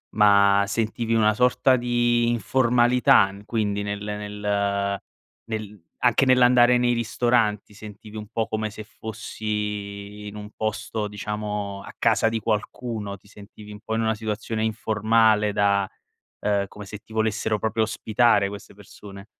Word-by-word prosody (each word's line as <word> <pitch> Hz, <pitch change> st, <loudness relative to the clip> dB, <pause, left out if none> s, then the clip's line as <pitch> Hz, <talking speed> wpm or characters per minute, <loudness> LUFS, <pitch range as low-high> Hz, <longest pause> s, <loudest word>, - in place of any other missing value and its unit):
Ma 100 Hz, -1 st, +5 dB
sentivi 115 Hz, +2 st, -1 dB
una 110 Hz, -1 st, +4 dB
sorta 125 Hz, +3 st, +3 dB
di 120 Hz, -1 st, +1 dB
informalità 120 Hz, -1 st, +3 dB
in 100 Hz, +1 st, -13 dB
quindi 105 Hz, -2 st, -1 dB
nel 100 Hz, 0 st, -4 dB
nel 100 Hz, -1 st, -2 dB, 0.4 s
nel 105 Hz, -4 st, -6 dB, 0.2 s
anche 120 Hz, +2 st, +4 dB
nell'andare 125 Hz, -1 st, +5 dB
nei 120 Hz, 0 st, +2 dB
ristoranti, 115 Hz, -3 st, 0 dB
sentivi 105 Hz, +1 st, -11 dB
un 105 Hz, 0 st, -7 dB
po' 110 Hz, +1 st, -2 dB
come 110 Hz, 0 st, -2 dB
se 110 Hz, +1 st, -9 dB
fossi 105 Hz, -2 st, -5 dB
in 105 Hz, -, -9 dB
un 105 Hz, 0 st, -8 dB
posto 110 Hz, 0 st, -3 dB
diciamo 105 Hz, -1 st, -4 dB
a -, -, -11 dB
casa -, -, +2 dB
di 115 Hz, 0 st, -2 dB
qualcuno, 105 Hz, 0 st, -3 dB
ti 100 Hz, -, -24 dB
sentivi 105 Hz, 0 st, -13 dB
un 105 Hz, -, -10 dB
po' 110 Hz, 0 st, -3 dB
in 115 Hz, -, 0 dB
una 110 Hz, 0 st, +1 dB
situazione 110 Hz, 0 st, -3 dB
informale 110 Hz, 0 st, +2 dB
da 100 Hz, -1 st, +2 dB, 0.5 s
ehm, 100 Hz, -1 st, 0 dB
come 105 Hz, 0 st, -11 dB
se 105 Hz, +1 st, -8 dB
ti 110 Hz, -, -18 dB
volessero 110 Hz, -1 st, 0 dB
proprio 110 Hz, +1 st, 0 dB
ospitare 110 Hz, -1 st, +2 dB
queste 100 Hz, 0 st, -10 dB
persone? 100 Hz, 0 st, -13 dB
105 Hz, 145 wpm, -24 LUFS, 105-115 Hz, 0.5 s, Ma